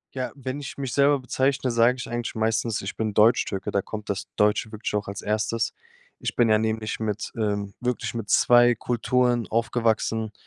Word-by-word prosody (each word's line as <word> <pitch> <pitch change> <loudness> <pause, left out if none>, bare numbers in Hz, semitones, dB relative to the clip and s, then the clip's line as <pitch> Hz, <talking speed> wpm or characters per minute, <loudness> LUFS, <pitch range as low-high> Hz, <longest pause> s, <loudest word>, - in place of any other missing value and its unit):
Ja, 130 -1 -3
wenn 135 0 -5
ich 140 - -7
mich 135 -3 -4
selber 140 +1 +4
bezeichne, 130 0 0
sage 115 +2 +4
ich 125 - -6
eigentlich 120 0 -4
meistens, 110 0 0
ich 95 - -5
bin 110 -2 -2
Deutschtürke, 105 -3 +3
da 100 - +1
kommt 105 +1 -8
das 100 0 -4
Deutsche 105 +1 +2
wirklich 110 0 -4
auch 105 -1 -1
als 100 0 -6
Erstes. 110 +1 -1 0.5
Ich - - -4
bin 120 -2 +3
ja 110 0 +4
nämlich 110 -1 -2
mit, 110 -1 -3
ähm 100 -2 -2
wirklich 125 -1 -2
mit 115 -3 -5
2 120 0 +5
Kulturen 120 0 +1
aufgewachsen. 115 0 0
115 Hz, 185 wpm, -25 LUFS, 105-120 Hz, 0.5 s, 2